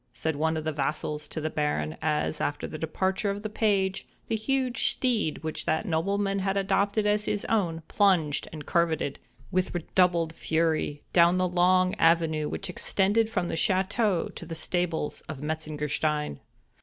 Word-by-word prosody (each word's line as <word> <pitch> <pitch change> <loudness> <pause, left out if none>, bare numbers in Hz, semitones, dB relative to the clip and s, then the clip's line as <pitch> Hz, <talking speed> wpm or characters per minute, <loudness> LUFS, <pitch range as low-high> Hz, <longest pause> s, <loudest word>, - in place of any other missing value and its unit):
said 160 +5 -2
one 160 +2 0
of 155 - -4
his 155 -2 -2
vassals 150 +1 -2
to - - -5
the 155 - -2
Baron, 115 - -1
as, 155 0 0
after 145 - -1
the 155 - -6
departure 190 +6 -1
of 200 +1 -3
the 215 - -4
page, 200 -3 +1 0.2
the 225 - +1
huge 255 +2 +1
steed 230 - 0
which 155 0 -4
that 160 +7 +1
nobleman 195 +3 0
had 195 +1 0
adopted 200 +2 +1
as 210 0 +2
his 205 -1 -1
own, 170 -7 0
plunged 175 -8 +2
and 155 -2 -8
curvetted, 165 -4 +1 0.3
with 185 -1 0
redoubled 170 -1 +2
fury, 160 -3 0
down 170 +1 +5
the 185 0 +2
long 185 +1 +3
avenue 165 -2 +3
which - - -4
extended 205 +4 +1
from 180 -6 -1
the - - -3
château 190 +2 +1
to - - -8
the 165 -1 -6
stables 170 -2 -2
of 155 -4 -5
Metzengerstein. 150 - -2
170 Hz, 165 wpm, -27 LUFS, 155-195 Hz, 0.3 s, down